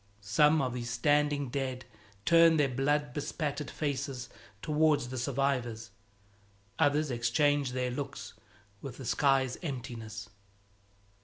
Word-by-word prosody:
Some 150 +7 +4
of 125 -2 -2
these 120 -1 -4
standing 145 +3 +1
dead 130 -1 -3 0.4
turn 165 -1 +6
their 145 -2 +3
blood 145 +2 0
bespattered 150 0 -3
faces 135 -4 -3 0.3
towards 150 -4 +2
the 130 - -5
survivors; 125 -4 -1 0.9
others 145 0 +2
exchange 130 +3 +1
their 125 -1 -1
looks 140 +3 -6 0.5
with 135 -4 -7
the 130 - -8
sky's 135 +1 +2
emptiness. 115 -7 -6
135 Hz, 110 wpm, -30 LUFS, 125-145 Hz, 0.9 s, turn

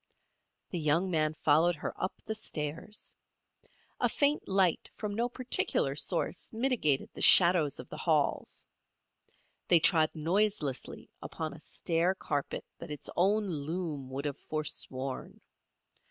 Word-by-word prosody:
The 175 - -2
young 165 +5 +1
man 155 -2 +1
followed 160 +3 +3
her - - -5
up 185 - -4
the 220 - -2
stairs. 165 -1 -6 0.8
A - - +2
faint 290 +1 +1
light 190 -3 +1
from 210 -2 -4
no 235 +3 0
particular 250 +1 +1
source - - -2
mitigated 225 - 0
the - - -9
shadows 170 -6 +7
of - - -8
the - - -8
halls. - - 0 1.0
They 170 - +6
trod 160 -1 +4
noiselessly 165 -3 -1
upon 160 -2 -5
a 150 - -12
stair 170 +4 -1
carpet 145 -6 -3
that 170 - -9
its 150 -1 -6
own 205 +4 +2
loom 155 -4 -4
would 135 +2 -5
have 145 -1 -3
forsworn. 135 -3 -5
165 Hz, 130 wpm, -30 LUFS, 150-195 Hz, 1.0 s, shadows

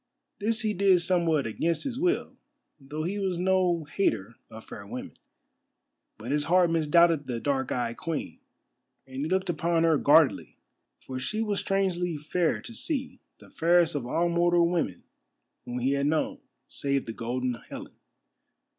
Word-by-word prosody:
This 220 +2 0
he 215 -1 0
did 190 -2 +4
somewhat 170 -4 +1
against 160 +9 -1
his 260 -2 -4
will, 360 +3 0 0.4
though 150 +3 -6
he 195 +5 -2
was 190 -3 -1
no 180 -2 +2
hater 145 - -1 0.2
of 110 -1 -11
fair 100 - -9
women. - - -7 1.0
But 115 +4 -6
his 145 0 +1
heart 175 0 +4
misdoubted 165 -1 +3
the 120 -2 -3
dark 135 0 -1
eyed 120 -2 -2
Queen, 165 -2 -4 0.7
and 130 -1 -11
he 145 +3 -2
looked 190 +1 0
upon 165 +1 +1
her 160 -3 +3
guardedly, 150 0 +4 0.4
for 130 -1 -6
she 175 +12 -2
was 205 -2 -1
strangely 180 -4 0
fair 160 +3 -1
to 235 - -9
see, 260 0 -3 0.2
the - - -18
fairest 170 0 +3
of 135 -5 -3
all 170 +7 +1
mortal 170 0 +3
women 170 - -2 0.6
whom 120 0 -5
he 125 +2 +1
had 140 0 +1
known, 155 +1 0 0.3
save 140 -1 -2
the 115 - -5
Golden 125 +2 -2 0.2
Helen. - - -8
165 Hz, 160 wpm, -27 LUFS, 140-180 Hz, 1.0 s, did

